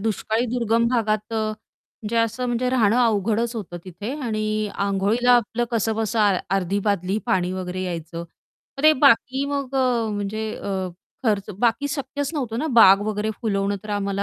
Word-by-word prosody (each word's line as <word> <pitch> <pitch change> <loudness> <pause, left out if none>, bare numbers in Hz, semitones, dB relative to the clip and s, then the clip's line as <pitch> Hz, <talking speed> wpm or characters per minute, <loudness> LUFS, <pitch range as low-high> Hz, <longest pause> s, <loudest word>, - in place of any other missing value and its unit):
दुष्काळी 220 +2 -1
दुर्गम 230 0 +2
भागात 215 -3 0
अ, - - -1 0.7
म्हणजे 220 +2 -3
असं 230 +2 0
म्हणजे 245 +1 0
राहणं 230 -3 +3
अवघडच 225 +2 0
होतं 180 -5 -6
तिथे. 200 +7 -6
आणि 215 -4 -2 0.3
आंघोळीला 200 +5 +2
आपलं 240 +1 -1
कसंबसं 225 0 -1
आ 205 -2 +4 0.2
अर्धी 195 +2 -1
बादली 200 0 0
पाणी 185 -4 +1
वगैरे 185 0 -4
यायचं. 170 -2 -5 0.6
मग - - -4
ते 310 - +8
बाकी 265 -1 +3
मग 280 -2 -3
अ, 250 -4 +2
म्हणजे 215 +2 -3
अ, 190 -2 -3 0.4
खर्च 210 -3 0
बाकी 240 +5 +1
शक्यच 280 0 -3
नव्हतं 235 -6 -2
ना, 310 - -1
बाग 225 -8 +7
वगैरे 215 0 -1
फुलवणं 200 -3 0
तर 215 - -8
आम्हाला 200 0 -2
220 Hz, 160 wpm, -23 LUFS, 200-240 Hz, 0.7 s, ते